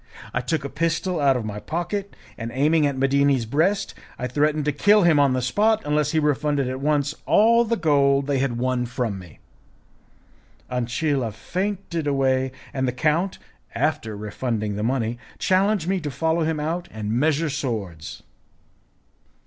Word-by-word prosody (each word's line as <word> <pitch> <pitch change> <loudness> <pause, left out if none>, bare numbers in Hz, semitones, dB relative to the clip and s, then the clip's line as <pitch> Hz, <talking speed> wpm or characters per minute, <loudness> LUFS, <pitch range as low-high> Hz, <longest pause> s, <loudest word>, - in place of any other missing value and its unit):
I 125 - 0
took 140 +3 -2
a - - -3
pistol 165 +3 -1
out 135 -3 +3
of 115 - -4
my 105 -1 -5
pocket, 190 - -4 0.2
and, 115 0 -5
aiming 150 +2 +3
at 140 -2 -3
Medini's 135 -2 +2
breast, 165 - +1 0.2
I - - -3
threatened 150 +3 +1
to 150 - +2
kill 205 +8 +4
him 165 -4 +5
on 140 -2 +4
the 130 -1 -1
spot 215 - +2
unless 150 0 +1
he 160 - -1
refunded 145 -2 +1
at 130 +1 -3
once 145 0 +1
all 235 +2 +5
the 230 +1 0
gold 140 -4 +3
they 140 -1 0
had 130 -3 -1
won 125 0 0
from 115 -5 -3
me. 85 -5 -13 1.3
Ancilla 125 +1 -1
fainted 180 - -3
away, 130 -2 +1 0.2
and 130 -1 -1
the - - +1
count, 160 +8 0 0.4
after 125 -8 -1
refunding 105 0 -3
the 105 - -3
money, 120 0 -1 0.2
challenged 190 -1 +2
me 190 0 +1
to 155 -3 -4
follow 160 +5 0
him 160 -1 -1
out 165 +4 -2
and 110 -1 -5
measure 150 +5 +1
swords. 100 - -4
140 Hz, 165 wpm, -23 LUFS, 125-160 Hz, 1.3 s, him